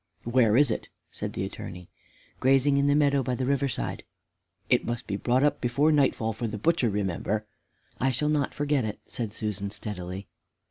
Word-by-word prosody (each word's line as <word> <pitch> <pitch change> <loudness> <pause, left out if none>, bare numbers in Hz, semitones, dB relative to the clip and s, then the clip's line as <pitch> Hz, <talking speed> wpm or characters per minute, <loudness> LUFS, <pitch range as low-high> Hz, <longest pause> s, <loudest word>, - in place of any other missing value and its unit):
"Where 120 -2 +3
is 140 -3 +5
it?" - - -3 0.2
said - - -5
the - - -2
Attorney. 90 0 -8 0.5
"Grazing 135 +2 +4
in 140 - +3
the 145 - +4
meadow, 140 -2 +3
by 125 0 -1
the 130 - -2
river 140 +1 +1
side." 130 - -3 0.6
"It - - +3
must 120 +1 -3
be 100 - -3
brought 125 +6 +2
up 150 - +2
before 140 +6 +3
nightfall 130 -6 +2
for 115 +2 -3
the 105 0 -4
butcher, 145 +1 +2
remember." 105 +1 -1 0.5
"I 130 - +2
shall 150 +4 0
not 150 -2 +1
forget 145 -2 +1
it," 105 -1 -4
said 115 -4 -4
Susan, 105 -2 -3
steadily. 95 -2 -5
125 Hz, 185 wpm, -27 LUFS, 105-140 Hz, 0.6 s, is